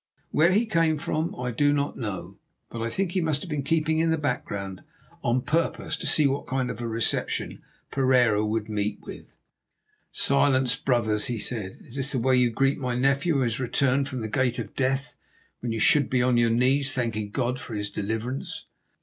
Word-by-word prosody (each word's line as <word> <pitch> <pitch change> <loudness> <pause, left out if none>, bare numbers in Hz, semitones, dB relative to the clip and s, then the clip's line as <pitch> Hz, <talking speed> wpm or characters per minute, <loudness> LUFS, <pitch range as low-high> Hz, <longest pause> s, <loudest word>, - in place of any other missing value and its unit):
Where 165 +4 +4
he 215 +5 +3
came 165 -7 +2
from 155 +1 -2
I 125 0 -2
do 145 +5 +2
not 145 0 0
know, 105 -6 -6 0.3
but 115 - -5
I 115 - -1
think 190 +7 -1
he 185 - 0
must 155 -3 0
have 175 - -8
been 150 -2 -1
keeping 160 +2 +1
in 165 0 +2
the 160 - +2
background 100 -9 -3 0.4
on 120 +1 +1
purpose 165 +2 0
to - - -4
see 155 - +4
what 140 0 0
kind 130 -1 -1
of 110 - -7
a 120 - -2
reception 115 0 -1 0.3
Pereira 125 -6 +3
would 110 0 -1
meet 105 -1 -2
with. - - -11 0.7
"Silence, 135 -3 +3
brothers," 110 -5 +1
he 120 - -2
said. 105 -3 -3
"Is 125 - -8
this 135 +1 -1
the - - +1
way 130 +2 +3
you 125 -1 +4
greet 135 +5 +1
my 125 -2 -2
nephew, 140 +5 +2
who 135 - +2
has 115 -2 0
returned 135 +2 +1
from 130 -3 -5
the 110 - -3
gate 125 +2 0
of 110 -4 -6
death, 135 +1 -1 0.4
when 120 - -3
you 115 - -2
should 145 +4 +4
be 125 -1 +2
on 125 0 +3
your 120 -1 +4
knees 135 +4 +2
thanking 110 -4 -2
God 125 +3 -1
for 115 - -7
his 105 0 -3
deliverance?" 110 +5 -4
130 Hz, 200 wpm, -26 LUFS, 115-140 Hz, 0.7 s, Where